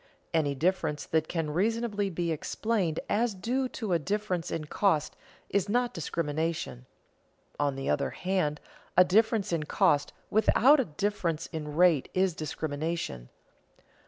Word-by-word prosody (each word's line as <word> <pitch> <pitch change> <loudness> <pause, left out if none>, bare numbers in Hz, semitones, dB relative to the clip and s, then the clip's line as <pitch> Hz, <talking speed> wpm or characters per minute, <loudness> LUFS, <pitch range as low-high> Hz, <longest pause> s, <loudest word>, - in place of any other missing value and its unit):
Any 150 -4 +1
difference 155 -1 0
that 160 -1 0
can 165 -3 -2
reasonably 205 +3 0
be 170 -1 -2
explained 180 +1 -1
as 220 0 +1
due 255 +7 -1
to 215 -7 -3
a 170 - +3
difference 185 0 -2
in 155 - -3
cost 160 -1 +1 0.3
is 200 0 0
not 245 +2 +1
discrimination; 155 -5 -3 0.7
on 145 -2 +1
the 135 0 -4
other - - +1
hand 180 -5 -1 0.4
a 180 - +9
difference 210 +1 +2
in 165 - +1
cost 145 -1 +2 0.2
without 245 +7 +5
a 265 - +2
difference 170 -2 -2
in 150 -2 -5
rate 170 -5 +4
is 185 -1 +2
discrimination. 155 - -4
170 Hz, 135 wpm, -29 LUFS, 155-205 Hz, 0.7 s, a